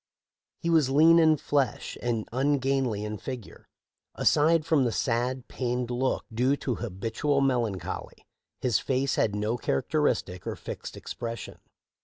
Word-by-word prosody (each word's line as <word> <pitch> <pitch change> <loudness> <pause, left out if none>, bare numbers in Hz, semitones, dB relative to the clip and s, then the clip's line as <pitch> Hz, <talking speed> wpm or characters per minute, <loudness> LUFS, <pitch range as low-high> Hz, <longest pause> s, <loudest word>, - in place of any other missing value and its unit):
He 170 - -2
was 155 -5 +4
lean 160 +5 +6
in 160 -1 +5
flesh 145 -2 -1
and 115 -3 -1
ungainly 135 -4 +1
in 105 -1 -5
figure. 125 -6 -8 0.5
Aside 155 +1 +3
from 160 -4 +3
the 120 - +1
sad, 125 +2 -1
pained 125 -1 -2
look 130 +2 0
due 125 +5 +2
to 125 -4 -2
habitual 115 +7 -1
melancholy, 120 -8 -2 0.4
his 125 -5 +2
face 135 +1 0
had 105 -2 +1
no 105 +3 -1
characteristic 90 - -1
or - - -2
fixed - - -7
expression. 115 -2 -6
125 Hz, 135 wpm, -27 LUFS, 115-140 Hz, 0.5 s, lean